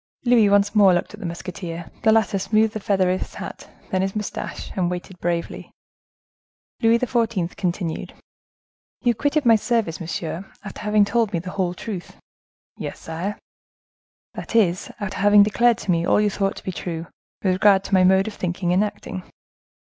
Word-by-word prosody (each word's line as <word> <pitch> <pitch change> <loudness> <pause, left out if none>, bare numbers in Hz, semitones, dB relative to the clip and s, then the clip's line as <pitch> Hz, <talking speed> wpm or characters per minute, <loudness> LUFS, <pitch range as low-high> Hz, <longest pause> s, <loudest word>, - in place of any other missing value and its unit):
Louis 235 -4 +5
once 205 0 +3
more 195 -4 +6
looked 175 - -2
at 210 - -10
the 190 - -4
musketeer. 170 -1 -6
The 220 - +4
latter 220 -3 +2
smoothed 215 +2 +2
the 215 - -3
feather 190 -2 +1
of 185 - 0
his - - -7
hat, - - -8 0.2
then 185 - +1
his 195 +1 -2
mustache, 210 -1 -5
and 180 -2 +1
waited 180 0 -6
bravely. 170 -1 -3 1.1
Louis 230 +1 +5
XIV. 230 -7 -1
continued: 175 -3 -3 0.9
"You 240 -2 +3
quitted 285 +5 0
my 230 -1 +7
service, 220 -6 0
monsieur, 170 +3 -4
after 200 - -8
having 210 -1 +3
told 225 0 0
me - - +1
the 180 +2 -5
whole 180 -2 -1
truth?" 190 -3 -7 0.6
"Yes, - - -6
sire." 170 +6 -4 1.0
"That - - -7
is, 185 -6 +2
after 205 -1 -4
having 205 0 +7
declared 235 +3 +3
to 190 - -2
me 170 0 +1
all - - +4
you 210 -1 +2
thought 195 0 -1
to - - -10
be 190 - -3
true, 170 -2 -5 0.4
with 190 -2 +3
regard 195 0 +4
to 195 - -7
my 185 -1 +6
mode 190 +2 +4
of 220 - -4
thinking 180 -1 -1
and 190 +3 +3
acting. 205 -2 -5
195 Hz, 180 wpm, -22 LUFS, 180-215 Hz, 1.1 s, my